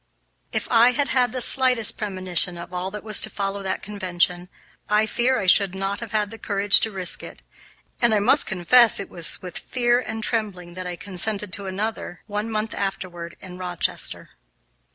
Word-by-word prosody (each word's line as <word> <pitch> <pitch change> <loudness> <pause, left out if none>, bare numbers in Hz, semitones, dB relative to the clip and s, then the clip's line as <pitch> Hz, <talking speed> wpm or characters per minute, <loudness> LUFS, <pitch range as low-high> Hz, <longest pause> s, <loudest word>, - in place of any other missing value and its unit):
If - - -2
I 240 +1 +6
had 285 -1 0
had 250 -3 +2
the 255 0 -2
slightest 250 -3 +5
premonition 185 -3 -1
of 170 +1 -10
all 180 +1 -3
that 210 +1 -8
was 215 -2 +1
to - - 0
follow 200 0 -4
that 190 -1 -4
convention, 180 -3 -1 0.4
I 210 +1 +3
fear 245 +4 +1
I 195 - -2
should 190 0 +4
not 195 +1 -3
have 230 -1 -8
had 210 -2 0
the 225 - -9
courage 200 -1 +4
to 225 - +1
risk 190 -4 -2
it, - - -11 0.6
and 240 -1 +4
I 215 - +3
must 250 +8 +3
confess 220 +5 +5
that - - -1
it - - -15
was 170 +1 -3
with 180 -2 -5
fear 240 -1 +1
and 220 -3 -5
trembling 200 -7 -3
that 185 0 -6
I 175 - -5
consented 200 +2 -3
to 200 - -4
attend 190 +1 -6
another, 215 -5 -4
one 210 +1 -4
month 215 0 -2
afterward, 175 -3 -5
in 180 -1 -10
Rochester. 180 -2 -2
200 Hz, 195 wpm, -23 LUFS, 185-225 Hz, 0.6 s, I